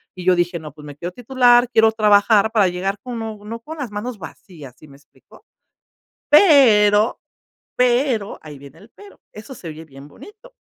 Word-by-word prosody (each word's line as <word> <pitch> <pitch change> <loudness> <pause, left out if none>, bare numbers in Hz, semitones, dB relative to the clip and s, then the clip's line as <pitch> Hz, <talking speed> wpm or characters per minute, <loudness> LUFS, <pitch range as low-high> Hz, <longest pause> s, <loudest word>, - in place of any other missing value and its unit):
y 180 -1 -10
yo 185 0 +3
dije: 175 0 -2
"No, 155 -3 -11
pues, 150 0 -15
me 145 -1 -11
quiero 175 +3 -7
titular, 245 +1 +2
quiero 220 -1 +3
trabajar 210 0 +3
para 210 -4 +2
llegar 185 +3 -4
con 245 -2 -7
no 220 0 -8
con 315 +7 -10
las 270 -5 -5
manos 215 +3 -6
vacías", 155 -5 -13
¿sí 155 - -17
me 140 - -17
explico?, 145 - -24 0.9
pero, 230 - +4 0.6
pero 245 -3 0
ahí 150 -2 -12
viene 140 -1 -16
el 215 - -19
pero, 405 0 -17
eso 215 +6 -12
se 180 -8 -11
oye 155 +1 -10
bien 140 -2 -15
bonito. 435 - -17
210 Hz, 180 wpm, -19 LUFS, 170-245 Hz, 0.9 s, pero